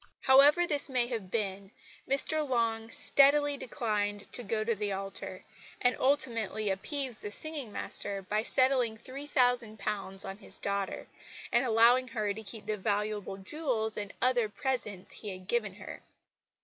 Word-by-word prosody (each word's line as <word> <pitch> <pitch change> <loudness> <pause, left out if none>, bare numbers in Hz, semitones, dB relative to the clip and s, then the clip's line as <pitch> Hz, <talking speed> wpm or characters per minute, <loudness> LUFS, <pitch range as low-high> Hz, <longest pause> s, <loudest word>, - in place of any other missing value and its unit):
However 285 +6 +6
this 295 -3 -1
may 250 -2 +1
have 225 -6 -5
been, 195 -2 -3 0.4
Mr 295 +2 +3
Long 225 -2 0
steadily 285 +4 +4
declined 210 -5 -2
to - - -2
go 215 -1 -2
to 230 +1 0
the 205 -1 -3
altar, 195 0 -5 0.4
and 245 0 +2
ultimately 230 -6 +1
appeased 255 +4 -4
the 210 - -6
singing 290 -2 -4
master 200 -1 -1
by 210 +3 -1
settling 255 -2 +1
£3,000 230 -7 +2
on 195 - -6
his 205 - -1
daughter, 200 -1 -3 0.5
and 260 - +2
allowing 240 +3 +5
her 215 -4 -2
to 220 - -8
keep 215 0 -9
the 215 0 -2
valuable 205 -1 -2
jewels 220 0 -2
and 205 -1 -5
other 245 -4 +2
presents 210 -6 -4
he 210 - -8
had 185 -1 -8
given 210 -4 -1
her. - - -9
225 Hz, 150 wpm, -30 LUFS, 205-255 Hz, 0.5 s, However